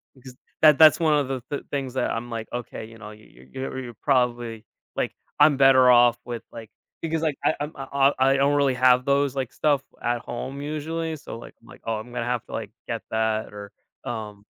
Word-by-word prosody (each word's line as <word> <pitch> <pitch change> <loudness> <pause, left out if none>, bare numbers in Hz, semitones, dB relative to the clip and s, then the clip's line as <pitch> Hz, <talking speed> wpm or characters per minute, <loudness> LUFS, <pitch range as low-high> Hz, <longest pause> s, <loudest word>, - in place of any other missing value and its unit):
because 130 -1 -13 0.3
that 150 -2 +7
that's 155 +1 +7
one 160 -2 +3
of 145 -2 +2
the 130 -1 -3
the 145 - -4
things 135 -3 -3
that 130 - -1
I'm 120 +1 -4
like, 115 -1 -5
okay, 120 -2 -5
you 115 +1 -13
know, 105 -2 -10
y 105 0 -15
y 65 - -16
you're 130 -2 -5
probably 120 -4 0 0.3
like, - - -1 0.3
I'm 150 -1 +6
better 130 -2 +6
off 120 -1 +6
with 120 -2 -6
like 115 -2 -10 0.3
because 165 -1 -2
like, 155 -3 0
I - - +2
I'm 145 +1 -3
uh, 135 - -6
uh, 140 0 +4
I 135 +1 +4
don't 140 +1 +3
really 140 -2 +2
have 125 0 +4
those, 140 -1 +1
like, 130 -2 -3
stuff 145 -3 +1 0.2
at 120 0 0
home 130 +4 -6
usually. 160 +2 -3
So, 135 - -9
like, - - -12
I'm - - -21
like, - - -15
"Oh, 115 - -1
I'm 115 +3 -10
gonna 120 -1 -2
have 120 -1 -2
to - - -15
like, - - -4 0.2
get - - -3
that 110 -1 -1
or, 100 -1 -9 0.3
um" 105 -3 -6
130 Hz, 220 wpm, -24 LUFS, 115-140 Hz, 0.3 s, that